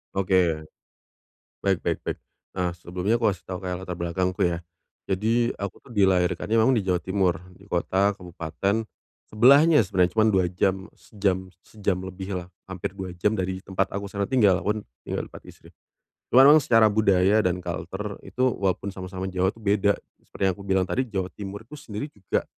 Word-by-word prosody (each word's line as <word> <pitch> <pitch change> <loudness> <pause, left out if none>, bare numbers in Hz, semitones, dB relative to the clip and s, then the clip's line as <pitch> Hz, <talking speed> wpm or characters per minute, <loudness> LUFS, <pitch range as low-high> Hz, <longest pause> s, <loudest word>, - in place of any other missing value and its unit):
Oke. 90 -5 +2 1.0
Baik 95 -2 +1
baik - - 0
baik. - - -4 0.4
Nah, 90 -2 0
sebelumnya 90 +6 -2
aku 115 - +3
kasih 95 -3 -3
tahu 90 -1 -5
kayak 90 -1 -3
latar 90 -1 -5
belakangku 90 +3 -2
ya. 85 -1 +1 0.5
Jadi, 115 +5 +1
aku 100 -1 -6
tuh - - -13
dilahirkannya 95 +1 +2
memang 115 +4 +4
di 120 - +2
Jawa 90 -2 +1
Timur, 95 -1 +1 0.2
di 100 +3 -19
kota 95 +3 +1
kabupaten 90 +4 -2 0.4
sebelahnya 140 +8 +6
sebenarnya. 90 -2 +1
Cuma 110 - +5
2 95 -2 +3
jam, 95 +2 -1
sejam 95 -3 -2
sejam 100 -3 -2
lebihlah 95 -1 -6 0.2
hampir 95 0 -6
2 95 -2 -5
jam 105 +5 +1
dari 95 -1 -2
tempat 95 0 -2
aku 100 +1 -4
sekarang 100 0 -3
tinggal. 105 -7 +5
Aku 105 - +2
kan 110 - -5 0.2
tinggal - - -3
tempat - - -12
istri. - - -15 0.6
Cuma 130 +2 +7
memang 150 +2 +8
secara 115 -4 +5
budaya 100 -1 +3
dan 90 0 0
culture - - -5
itu 125 - -2
walaupun 95 0 -1
sama-sama 95 0 -6
Jawa 95 0 +1
tu 115 - -17
beda. 100 -1 +2 0.2
Seperti - - -15
yang - - 0
aku 100 - -11
bilang 95 -1 +2
tadi, 130 +8 -1
Jawa 95 -3 -2
Timur 100 0 -7
itu 125 - -15
sendiri 105 -3 -6
juga 100 -9 -3
95 Hz, 180 wpm, -25 LUFS, 90-105 Hz, 1.0 s, memang